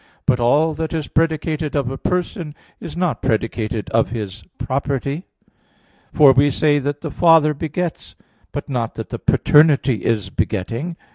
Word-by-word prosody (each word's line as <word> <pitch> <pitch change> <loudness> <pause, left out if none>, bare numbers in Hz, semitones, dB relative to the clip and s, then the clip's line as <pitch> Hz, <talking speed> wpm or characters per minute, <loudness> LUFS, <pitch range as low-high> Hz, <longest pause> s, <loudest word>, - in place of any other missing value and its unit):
But 125 - +2
all 145 +7 +3
that 160 +1 -3
is 155 -3 -3
predicated 160 -1 -1
of 135 -3 0
a 135 - -5
Person 175 -4 -2 0.2
is 165 -2 -8
not 180 -3 -1
predicated 110 -2 -1
of 115 0 +2
His 105 -3 -6
property. 140 +4 -2 0.8
For 145 -3 +6
we 140 +2 +4
say 145 +1 +2
that 145 +1 -3
the 160 - -5
Father 165 -3 +5
begets; 160 +3 -4 0.4
but 145 - -5
not 120 -5 -3
that - - -6
the - - -5
paternity 140 - +3
is 105 -4 -1
begetting. 120 - -3
145 Hz, 150 wpm, -20 LUFS, 120-160 Hz, 0.8 s, For